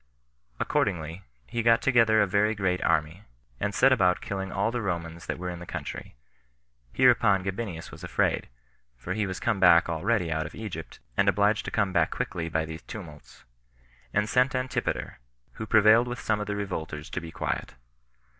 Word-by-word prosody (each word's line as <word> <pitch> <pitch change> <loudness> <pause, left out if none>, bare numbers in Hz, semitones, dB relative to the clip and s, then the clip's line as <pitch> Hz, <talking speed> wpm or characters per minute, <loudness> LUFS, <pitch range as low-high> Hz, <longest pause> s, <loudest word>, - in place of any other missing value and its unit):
Accordingly, 85 -2 -1 0.2
he 115 - -3
got 115 0 +5
together 115 -5 +4
a - - +2
very 105 +3 +1
great 95 -2 0
army, 80 +2 0 0.4
and 100 - -1
set 125 +8 +4
about 90 -8 +3
killing 95 -1 -4
all 100 +3 0
the 120 0 -2
Romans 85 -4 -4
that - - -3
were 90 0 -4
in 85 - -7
the 90 - -8
country; - - -6 0.8
hereupon 115 -7 +4
Gabinius 95 -3 -5
was - - -12
afraid, - - 0 0.5
[for 85 +10 -4
he 105 0 -1
was 95 - -4
come 110 -4 0
back 85 -2 +6
already 90 +1 0
out 80 -1 -1
of 80 - -12
Egypt, 100 -8 -7 0.2
and 100 - +3
obliged 105 +2 +2
to - - -3
come 100 -4 0
back 85 -3 +3
quickly 85 -1 -3
by 80 0 0
these 80 +1 -8
tumults,] 75 - -11 0.7
and 105 0 +1
sent 130 +5 +2
Antipater, 130 0 -2 0.3
who 110 - -7
prevailed 110 +3 +5
with 120 0 -5
some 105 -1 0
of 105 - -4
the 105 - -2
revolters 80 -6 -4
to 90 - -3
be 85 - -8
quiet. - - -4
95 Hz, 180 wpm, -27 LUFS, 85-110 Hz, 0.8 s, back